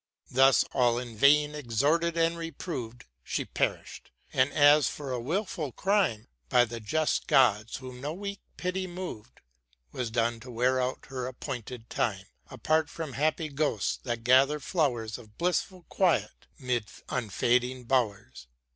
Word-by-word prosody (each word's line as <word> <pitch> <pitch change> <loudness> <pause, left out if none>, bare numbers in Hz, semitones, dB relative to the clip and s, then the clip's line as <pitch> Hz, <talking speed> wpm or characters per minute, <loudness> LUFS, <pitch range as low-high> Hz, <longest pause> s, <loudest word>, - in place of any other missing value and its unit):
Thus, 135 +1 +5
all 120 -2 +3
in 120 -2 -6
vain 150 +5 +5
exhorted 150 +6 +1
and 165 0 +2
reproved, 155 - -6 0.2
She - - -2
perished; - - -3 0.2
and 130 +2 +3
as 145 0 +5
for 140 -3 -6
a 125 - -1
wilful 155 - -2
crime, 190 - +1 0.2
By 120 - +5
the 115 0 -7
just 155 +8 0
Gods 120 - +3
whom 130 -1 -9
no 145 +2 -3
weak 200 +3 -6 0.2
pity 185 +1 -2
mov'd. 175 - -8 0.5
Was 125 -2 -3
doom'd 115 0 0
to 125 - -11
wear 125 +2 +1
out 125 +1 -3
her 130 -2 -4
appointed 125 -2 -7
time, - - -1 0.2
Apart 155 -1 0
from 160 -5 -6
happy 155 +3 0
Ghosts, 140 - 0
that 120 -2 -4
gather 135 +5 +5
flowers 125 - -1
Of 110 -3 -17
blissful 180 +1 -1
quiet 185 -3 0
'mid 125 -5 -1 0.2
unfading 125 +2 0
bowers. 105 - -1
130 Hz, 145 wpm, -28 LUFS, 120-155 Hz, 0.5 s, Thus